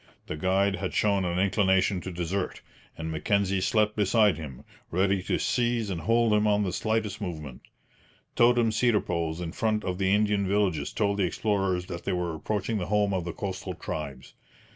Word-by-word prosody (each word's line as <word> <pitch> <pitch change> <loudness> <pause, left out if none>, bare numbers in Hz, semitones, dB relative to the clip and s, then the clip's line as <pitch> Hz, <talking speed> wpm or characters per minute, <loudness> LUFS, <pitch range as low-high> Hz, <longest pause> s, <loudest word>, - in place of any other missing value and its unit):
The - - -5
guide 95 +4 +1
had 95 -1 -4
shown 100 -3 +2
an 85 0 -1
inclination 95 -1 +2
to 95 - -6
desert, 90 +2 -3 0.3
and 80 0 -4
Mackenzie 95 +4 +1
slept 105 +1 +2
beside 105 0 +3
him, 70 -6 -8 0.3
ready 95 +2 +1
to - - -1
seize 120 -4 0
and 85 -3 -3
hold 115 +2 +3
him 105 0 +3
on 105 0 +3
the 90 -3 -2
slightest 110 -1 -1
movement. 75 -9 -6 0.7
Totem 120 -1 +4
cedar 115 -1 +3
poles 85 -2 -2
in 85 -2 -4
front 110 +1 0
of 90 0 -3
the 95 0 +2
Indian 105 -1 +2
villages 95 -7 0
told 100 -1 0
the 95 - +3
explorers 95 -2 0
that 90 -1 -7
they - - -1
were 90 -2 -1
approaching 105 +6 -2
the 90 - -3
home 105 -1 +2
of 90 -3 -1
the 85 - -3
coastal 95 -1 -5
tribes. 70 -6 -6
95 Hz, 185 wpm, -27 LUFS, 90-105 Hz, 0.7 s, Totem